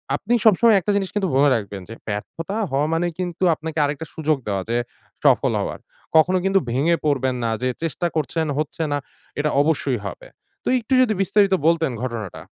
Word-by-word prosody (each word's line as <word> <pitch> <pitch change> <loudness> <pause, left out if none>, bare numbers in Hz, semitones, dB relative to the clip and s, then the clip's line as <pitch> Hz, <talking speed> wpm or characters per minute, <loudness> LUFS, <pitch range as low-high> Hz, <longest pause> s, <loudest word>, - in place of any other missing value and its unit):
আপনি 205 +10 -2
সবসময় 220 +1 +6
একটা 200 +3 -1
জিনিস 195 -2 0 0.3
মনে 145 +1 +5
রাখবেন 100 -3 -4
যে 115 - -7
ব্যর্থতা 160 - -4 0.2
হওয়া 140 +2 +1
মানে 170 +2 +1
কিন্তু 180 0 -3
আপনাকে 160 +1 -5
আরেকটা 145 +3 -3
সুযোগ 155 -1 +1
দেওয়া 100 -2 -1
যে 120 - +1 0.5
সফল - - +4
হওয়ার। - - -4 0.4
কখনো 185 +4 +4
কিন্তু 195 0 +4
ভেঙে 150 +7 +2
পড়বেন 130 -3 +1
না 115 - 0
যে 130 - +2
চেষ্টা 165 +2 -1
করছেন 160 +1 -1
হচ্ছে 155 +2 -2
না, 145 - +1 0.4
এটা 150 +1 +1
অবশ্যই 145 -5 0
হবে। 95 - -9 0.4
তো - - +1
একটু 240 +3 -3
যদি 235 -4 +3
বিস্তারিত 195 0 +3
বলতেন 165 -4 +2
ঘটনাটা? 115 -7 -5
155 Hz, 175 wpm, -22 LUFS, 130-180 Hz, 0.5 s, সবসময়